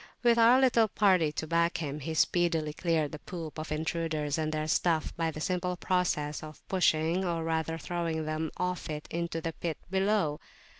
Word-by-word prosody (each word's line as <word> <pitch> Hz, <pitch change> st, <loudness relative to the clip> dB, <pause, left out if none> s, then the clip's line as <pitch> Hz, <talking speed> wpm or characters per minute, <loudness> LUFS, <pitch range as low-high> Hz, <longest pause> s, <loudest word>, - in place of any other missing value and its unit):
With 235 Hz, -1 st, +5 dB
our 235 Hz, +3 st, +7 dB
little 240 Hz, -4 st, +4 dB
party 185 Hz, -7 st, +3 dB
to 160 Hz, -, -3 dB
back 170 Hz, +1 st, +1 dB
him, 150 Hz, -2 st, -4 dB
he 160 Hz, +3 st, -4 dB
speedily 165 Hz, -2 st, +2 dB
cleared 160 Hz, -3 st, 0 dB
the 150 Hz, -, -7 dB
poop 165 Hz, -3 st, -7 dB
of 155 Hz, 0 st, -6 dB
intruders 155 Hz, -1 st, -1 dB
and 155 Hz, 0 st, -1 dB
their 155 Hz, 0 st, -2 dB
stuff 160 Hz, 0 st, +1 dB
by 165 Hz, -1 st, 0 dB
the 155 Hz, -, -6 dB
simple 180 Hz, +2 st, -1 dB
process 175 Hz, -6 st, 0 dB
of 155 Hz, -1 st, -11 dB
pushing 175 Hz, -1 st, +2 dB
or 170 Hz, -3 st, -1 dB
rather 160 Hz, 0 st, -1 dB
throwing 165 Hz, -2 st, -2 dB
them 155 Hz, +1 st, -2 dB
off 180 Hz, -2 st, -2 dB
it 150 Hz, -1 st, -5 dB
into 170 Hz, -1 st, -2 dB
the 165 Hz, 0 st, -3 dB
pit 165 Hz, 0 st, -4 dB
below. 190 Hz, -6 st, +1 dB
165 Hz, 185 wpm, -30 LUFS, 155-180 Hz, -, our